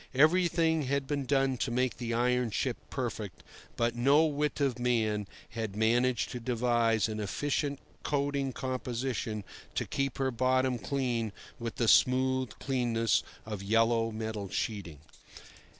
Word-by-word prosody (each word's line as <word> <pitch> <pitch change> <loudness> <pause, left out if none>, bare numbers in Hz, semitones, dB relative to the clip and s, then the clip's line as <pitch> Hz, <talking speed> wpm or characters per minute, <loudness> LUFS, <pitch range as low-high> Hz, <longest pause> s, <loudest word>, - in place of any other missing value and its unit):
Everything 165 +1 +4
had 140 +1 0
been 140 0 -2
done 135 -1 +2
to 125 - -1
make 125 0 0
the 120 -1 -3
iron 125 +1 +2
ship 105 - -1
perfect, - - -4 0.3
but 120 0 +1
no 140 +6 +5
wit 150 -1 -1
of 135 -4 +1
man 110 -4 +1 0.2
had 110 -3 -4
managed 120 +3 +2
to 125 - -4
devise 120 -2 +2
an 110 -1 -4
efficient 140 +7 -1 0.2
coating 140 -2 0
composition 125 -4 -3 0.3
to - - 0
keep 135 -2 -2
her 135 -1 0
bottom 130 +1 +1
clean 120 -1 -1 0.3
with 115 -1 -4
the 115 - 0
smooth 130 +1 +4
cleanness 120 -4 +1 0.2
of 105 -3 -5
yellow 115 +2 +2
metal 110 -3 -4
sheeting. 95 -9 -3
125 Hz, 135 wpm, -30 LUFS, 115-135 Hz, 0.3 s, no